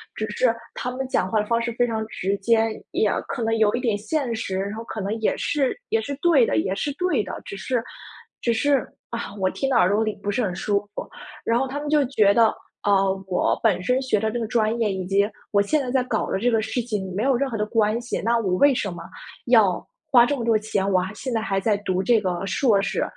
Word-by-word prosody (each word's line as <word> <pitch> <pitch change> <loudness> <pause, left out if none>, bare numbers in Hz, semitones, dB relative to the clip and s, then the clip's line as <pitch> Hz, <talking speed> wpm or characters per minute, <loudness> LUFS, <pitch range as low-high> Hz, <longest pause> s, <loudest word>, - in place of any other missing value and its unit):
只 215 - -2
是 230 +2 +1 0.2
他 250 - -4
们 265 +1 -4
讲 185 -7 0
话 215 +1 +2
的 - - -4
方 230 +1 +1
式 235 0 -2
非 245 - +2
常 220 -2 -3
直 200 -1 -2
接， 225 +2 +3 0.3
也 210 - +2 0.2
可 235 - -3
能 225 0 +1
有 215 -1 +3
一 245 - -2
点 225 -5 +1
现 240 +4 -2
实， 195 -4 -3
然 200 +2 -3
后 225 - -6
可 220 - -5
能 200 +2 -2
也 220 - +1
是 280 -3 0
也 450 0 +1
是 280 -9 -5
对 315 -8 +5
的， - - -1
也 110 - 0
是 195 +9 -2
对 360 - 0
的， 185 - -7
只 200 - -7
是 240 +3 -1 0.6
只 235 - +1
是， 275 +3 +1 0.2
啊， 235 -4 -5
我 190 -1 +2
听 270 - -2
到 260 - +3
耳 185 - +4
朵 210 +3 +2
里 215 -1 -1
不 200 - -3
是 245 - 0
很 185 -4 -2
舒 200 +2 0
服。 - - -6 0.3
然 230 - +2
后 265 - 0
他 280 +2 -4
们 295 0 -4
就 300 -2 +3
觉 215 -6 +3
得， 225 0 +4 0.3
呃， 195 -1 +2
我 185 - +1
本 190 -5 +3
身 250 +7 +2
学 260 -5 +1
的 220 +1 0
这 240 - -2
个 230 - -2
专 225 0 +1
业 215 -4 +1
以 190 -1 -3
及 200 +1 +3 0.2
我 200 - +3
现 290 +9 +1
在 255 - -4
在 260 -1 +2
搞 230 -3 -2
的 - - +1
这 240 +4 +2
个 225 -1 +2
事 220 +3 -2
情 210 -5 -4
没 205 - -1
有 270 0 +3
任 270 +2 0
何 230 - -3
的 210 - 0
关 215 0 +1
系， 240 0 -4
那 235 +1 +2
我 200 -5 0
为 285 +8 +5
什 205 -5 -2
么 175 - -8 0.4
要 - - +4 0.3
花 245 -3 +8
这 285 - 0
么 235 - -3
多 225 -2 +4
钱， 205 -2 -1
我 185 -2 +3
还 185 +1 -3
现 260 +1 -4
在 225 - 0
还 195 -3 -1
在 205 +2 +1
读 185 -2 -1
这 230 0 +3
个 185 -1 -2
硕 210 +1 +2
士。 - - -1
220 Hz, 280 characters per minute, -23 LUFS, 200-245 Hz, 0.6 s, 花